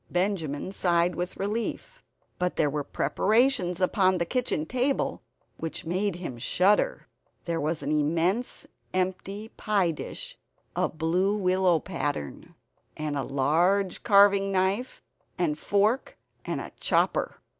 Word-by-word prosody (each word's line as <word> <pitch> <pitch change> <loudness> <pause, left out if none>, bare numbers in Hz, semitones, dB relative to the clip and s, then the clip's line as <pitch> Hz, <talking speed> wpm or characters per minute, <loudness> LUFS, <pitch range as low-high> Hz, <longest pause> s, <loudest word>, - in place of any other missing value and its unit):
Benjamin 180 -4 -1
sighed 175 -2 +2
with 180 +1 -4
relief. 230 - -3 0.4
But 180 0 0
there 150 -2 +2
were 145 0 -2
preparations 190 - +1
upon 185 0 +3
the 170 - 0
kitchen 245 -9 -1
table 255 - 0 0.4
which 165 0 -5
made 185 +3 0
him 170 -9 -6
shudder. 190 - +2 0.4
There 170 -1 -2
was 155 +2 -1
an 145 - -2
immense 165 +10 0 0.3
empty 190 +3 -2
pie 200 -5 +1
dish 155 - -6 0.4
of 155 - -1
blue 180 +6 +1
willow 185 -2 +3
pattern, 145 - -4 0.4
and 155 -1 -2
a 140 - 0
large 170 +9 +1
carving 200 -2 +5
knife 195 +7 0 0.3
and 170 -5 +1
fork, 205 - +1 0.3
and - - -2
a - - -7
chopper. - - +1
185 Hz, 125 wpm, -27 LUFS, 160-200 Hz, 0.4 s, carving